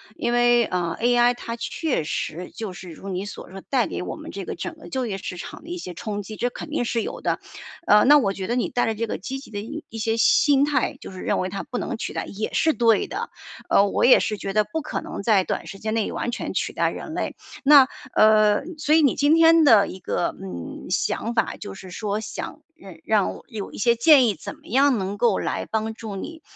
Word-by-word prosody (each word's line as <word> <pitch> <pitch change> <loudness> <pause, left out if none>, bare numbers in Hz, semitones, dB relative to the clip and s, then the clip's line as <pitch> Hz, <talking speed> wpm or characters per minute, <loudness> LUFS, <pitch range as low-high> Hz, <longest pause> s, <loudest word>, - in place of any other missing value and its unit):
因 240 0 -1
为， 240 -1 +4
嗯 170 -2 -2
，AI 240 +1 +4
它 230 -1 -6
确 255 - -2
实 165 +3 -4
就 215 -5 -6
是 180 0 -10
如 195 +4 -9
你 190 +2 -3
所 205 - -9
说， 195 0 -8
带 260 -3 +2
给 - - -4
我 - - -5
们 - - -9
这 - - -6
个 - - -5
整 340 -1 -6
个 320 - -13
就 260 -2 -2
业 195 -3 -3
市 180 - -6
场 - - -8
的 335 - -12
一 355 - -4
些 180 - -7
冲 205 +3 -5
击， 215 +2 -8
这 245 - -1
肯 300 - -8
定 295 - 0
是 230 -1 -1
有 - - -6
的。 - - -1 0.5
呃， 210 0 +6
那 295 +2 +8
我 200 -8 +1
觉 190 -1 -5
得 240 - 0
你 250 - 0
带 245 - 0
着 220 - -1
这 230 +2 -2
个 - - -4
积 265 +7 -5
极 270 - -14
的 205 - -4 0.3
一 225 - -8
些 225 +1 0
心 280 +4 +4
态， 295 -2 0
就 - - -9
是 185 - -9
认 - - 0
为 185 - -1
它 195 +1 -4
不 245 - -5
能 - - -3
取 - - -4
代 - - -3
也 210 +2 -4
是 320 -1 +3
对 230 -3 +3
的。 450 +5 -4 0.4
呃， 200 - +5
我 - - 0
也 250 - +7
是 215 - -1
觉 195 0 -4
得， 215 0 +3
不 320 +4 -4
可 - - -4
能 - - -6
在 200 -3 +3
短 - - -4
时 195 - -8
间 215 0 -3
内 225 -2 0
完 240 - -3
全 - - -4
取 - - -2
代 - - +1
人 - - -7
类。 - - -3 0.3
那， 280 -2 +8 0.3
呃 215 -1 +6 0.3
所 300 +1 +3
以 320 - +6
你 275 - +4
今 290 +3 +4
天 330 0 +6
的 220 -8 +6
一 185 - -8
个， 175 - -2
嗯， 90 -3 -7
想 230 +2 -1
法， 230 - +1
就 205 - -7
是 185 -1 -11
说 210 +1 -2
想 - - -7 0.4
让 215 -3 +2
我 - - -13
有 215 -5 -6
一 - - -10
些 235 +2 +3
建 270 +1 +6
议， 210 - +1
怎 - - -8
么 - - -25
样 270 +1 +3
能 195 +1 -3
够 230 -4 +3
来 - - -2
帮 220 0 -1
助 220 -3 -7
你， 320 - -7
225 Hz, 270 characters per minute, -23 LUFS, 200-260 Hz, 0.5 s, 那